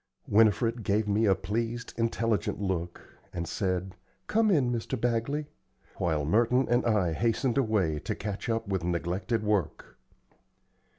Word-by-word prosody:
Winifred 115 Hz, +2 st, +3 dB
gave 105 Hz, +1 st, 0 dB
me 105 Hz, +2 st, +2 dB
a 95 Hz, -, +5 dB
pleased, 115 Hz, +4 st, -3 dB
intelligent 115 Hz, -2 st, 0 dB
look, 90 Hz, -3 st, -4 dB
and 85 Hz, -1 st, -4 dB
said, 95 Hz, -1 st, -2 dB, 0.3 s
"Come 220 Hz, 0 st, +2 dB
in, 140 Hz, -10 st, +3 dB
Mr. 120 Hz, +2 st, -3 dB
Bagley;" 120 Hz, +6 st, 0 dB, 0.5 s
while 80 Hz, -4 st, 0 dB
Merton 120 Hz, -, +3 dB
and 120 Hz, +1 st, +3 dB
I 100 Hz, -7 st, +2 dB
hastened 120 Hz, -, +1 dB
away 100 Hz, -, +1 dB
to -, -, -4 dB
catch 105 Hz, +1 st, -5 dB
up 115 Hz, -1 st, -1 dB
with 95 Hz, -3 st, -1 dB
neglected 90 Hz, +5 st, -1 dB
work. 105 Hz, -7 st, -2 dB
110 Hz, 135 wpm, -28 LUFS, 95-115 Hz, 0.5 s, a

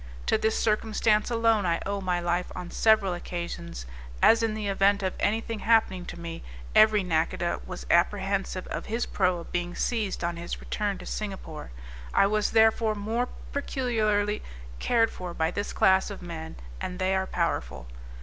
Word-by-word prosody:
To -, -, +3 dB
this 220 Hz, 0 st, +1 dB
circumstance 215 Hz, 0 st, +2 dB
alone 230 Hz, -3 st, +3 dB
I 170 Hz, -2 st, +1 dB
owe 200 Hz, 0 st, -2 dB
my 180 Hz, -2 st, 0 dB
life 175 Hz, +1 st, -1 dB
on 175 Hz, -1 st, -6 dB
several 215 Hz, -4 st, +3 dB
occasions, 170 Hz, -, -5 dB, 0.3 s
as 230 Hz, -, +6 dB
in 225 Hz, -1 st, 0 dB
the 215 Hz, -1 st, -4 dB
event 200 Hz, +1 st, +3 dB
of 185 Hz, -, 0 dB
any 220 Hz, +2 st, +1 dB
thing 225 Hz, -1 st, -5 dB
happening 205 Hz, -6 st, +2 dB
to -, -, -7 dB
me, 165 Hz, -1 st, -6 dB, 0.3 s
every 215 Hz, -2 st, +6 dB
nacodah 170 Hz, 0 st, 0 dB
was -, -, -7 dB
apprehensive 190 Hz, +1 st, +1 dB
of -, -, -4 dB
his 230 Hz, +2 st, -1 dB
proa 180 Hz, -2 st, 0 dB
being 175 Hz, +1 st, -3 dB
seized 215 Hz, -7 st, -1 dB
on 170 Hz, 0 st, -1 dB
his 170 Hz, 0 st, -5 dB
return 205 Hz, -2 st, -2 dB
to 180 Hz, -, -10 dB
Singapore; 195 Hz, -, -5 dB, 0.5 s
I -, -, +6 dB
was 210 Hz, +1 st, +1 dB
therefore 220 Hz, 0 st, +4 dB
more 225 Hz, +4 st, -1 dB, 0.2 s
peculiarly 215 Hz, -7 st, 0 dB, 0.4 s
cared 230 Hz, -2 st, +2 dB
for 180 Hz, -2 st, -7 dB
by 160 Hz, +1 st, +1 dB
this 205 Hz, +3 st, -3 dB
class 190 Hz, +1 st, +3 dB
of 200 Hz, -3 st, -8 dB
men, 160 Hz, -2 st, -7 dB, 0.3 s
and 180 Hz, -, -4 dB
they 190 Hz, 0 st, +1 dB
are 190 Hz, 0 st, 0 dB
powerful. 60 Hz, -, -2 dB
195 Hz, 170 wpm, -27 LUFS, 175-220 Hz, 0.5 s, as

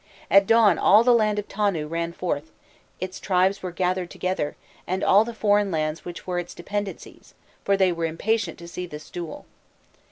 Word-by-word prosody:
At 195 Hz, 0 st, +6 dB
dawn 225 Hz, -6 st, +5 dB
all 215 Hz, +3 st, +6 dB
the 245 Hz, 0 st, +5 dB
land 215 Hz, -3 st, +2 dB
of 210 Hz, -, -3 dB
Tonu 195 Hz, -7 st, -1 dB
ran 170 Hz, +1 st, -2 dB
forth; 160 Hz, -3 st, -3 dB, 0.5 s
its 185 Hz, 0 st, -5 dB
tribes 190 Hz, +1 st, +1 dB
were 185 Hz, -, -4 dB
gathered 180 Hz, 0 st, -1 dB
together, 185 Hz, -5 st, -2 dB, 0.3 s
and 185 Hz, +1 st, -2 dB
all 200 Hz, +3 st, +6 dB
the 235 Hz, -, -6 dB
foreign 205 Hz, -2 st, +2 dB
lands 155 Hz, -2 st, -2 dB
which 175 Hz, 0 st, -8 dB
were 180 Hz, -1 st, -1 dB
its 175 Hz, -, -7 dB
dependencies, 205 Hz, +3 st, -6 dB, 0.3 s
for 200 Hz, 0 st, +2 dB
they 190 Hz, -2 st, +3 dB
were 170 Hz, -1 st, -2 dB
impatient 175 Hz, +3 st, -1 dB
to 170 Hz, -, -11 dB
see 180 Hz, +1 st, -6 dB
this 150 Hz, -2 st, -10 dB
duel. 170 Hz, -3 st, -7 dB
185 Hz, 185 wpm, -24 LUFS, 170-205 Hz, 0.5 s, At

